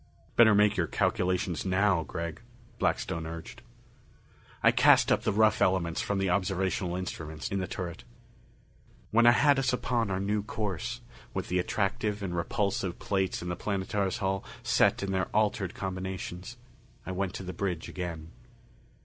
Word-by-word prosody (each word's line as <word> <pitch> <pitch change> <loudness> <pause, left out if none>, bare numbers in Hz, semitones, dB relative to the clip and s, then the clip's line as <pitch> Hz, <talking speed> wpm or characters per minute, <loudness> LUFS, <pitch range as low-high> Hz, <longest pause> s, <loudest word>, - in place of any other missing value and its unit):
"Better 110 -3 +7
make 105 +1 +4
your 85 -2 +1
calculations 90 -1 0
now, 95 -1 +2
Gregg," 80 0 -5 0.4
Blackstone 80 -1 -1
urged. 80 0 -8 1.0
I - - +7
cast - - +5
up - - +3
the - - 0
rough 110 +1 +3
elements 85 -3 +2
from 100 - -1
the 95 0 +1
observational 95 -1 0
instruments 80 -4 -5
in 100 - 0
the 95 - -2
turret. 90 -7 -5 1.1
When 115 +2 +5
I - - +10
had 140 +2 +4
us 130 -1 +1
upon 120 -3 0
our 95 -1 -1
new 105 +2 0
course, 110 +3 -4 0.3
with 95 - -3
the 90 - +1
attractive 100 +2 -1
and 90 -2 -3
repulsive 95 +1 -1
plates 95 -3 -1
in 90 - -4
the 90 - -1
Planetara's 100 0 -1
hull 95 0 -1 0.2
set - - +3
in 100 - -2
their 95 -2 0
altered 105 -3 +1
combinations, 95 +3 -5 0.5
I 95 - -4
went 95 0 -2
to - - -5
the 90 0 -5
bridge 90 -3 -3
again. 85 -3 -6
95 Hz, 160 wpm, -29 LUFS, 90-105 Hz, 1.1 s, I